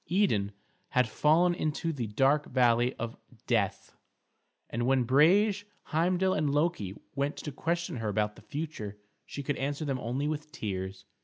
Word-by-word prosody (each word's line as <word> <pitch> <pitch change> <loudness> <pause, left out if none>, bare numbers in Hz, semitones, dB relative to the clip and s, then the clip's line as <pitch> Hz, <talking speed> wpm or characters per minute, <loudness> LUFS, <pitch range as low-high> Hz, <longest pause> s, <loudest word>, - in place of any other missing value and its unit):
Idun 140 - +2 0.4
had 125 -2 +3
fallen 160 +10 +3
into 160 0 -1
the 125 -6 -3
dark 135 +7 +2
valley 120 -1 +3
of 120 -1 -5 0.3
death, 105 -6 0 0.7
and 120 +1 -2
when 130 -1 +3
Brage, 195 - +4 0.2
Heimdal, 180 +4 +2
and 155 -1 +1
Loki 145 - 0 0.2
went 140 +1 -1
to 150 - -5
question 170 +1 -2
her 110 -2 -2
about 105 0 0
the - - -14
future 140 -10 -5 0.3
she 140 - -6
could 145 +1 -1
answer 145 +3 -2
them 135 -3 -1
only 130 +5 -2
with 150 0 -4
tears. 95 -3 -5
140 Hz, 155 wpm, -30 LUFS, 115-155 Hz, 0.7 s, Brage